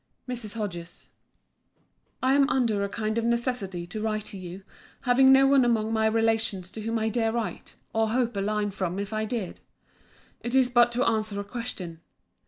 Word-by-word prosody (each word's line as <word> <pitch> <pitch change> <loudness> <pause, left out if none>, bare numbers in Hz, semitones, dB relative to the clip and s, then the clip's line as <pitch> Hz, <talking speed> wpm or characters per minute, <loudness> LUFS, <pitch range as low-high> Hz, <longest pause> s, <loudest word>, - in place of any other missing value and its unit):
MRS. 235 -4 -4
HODGES, 175 -6 -6 1.1
I 260 +1 +4
am 280 0 +4
under 230 -7 +1
a 200 - -2
kind 215 +1 -1
of - - -2
necessity 235 -7 0
to 210 +5 -6
write 215 -1 -1
to 200 - -7
you, 185 +1 -8 0.4
having 260 +2 +5
no 270 0 +7
one 270 -1 +5
among 225 -2 +1
my 220 0 +3
relations 220 -4 0
to 220 - -7
whom 225 +1 -1
I 220 0 0
dare 225 -1 +1
write, 230 -1 -4 0.2
or 225 0 +2
hope 240 -1 0
a 200 - -1
line 210 0 0
from 185 -2 -3
if 200 +2 -4
I 215 0 -1
did. 215 -5 -4 0.8
It 240 +2 -3
is 255 -2 +4
but 240 -1 +5
to 250 +2 +1
answer 215 -2 0
a - - -2
question. 200 -7 -6
220 Hz, 190 wpm, -27 LUFS, 200-240 Hz, 1.1 s, no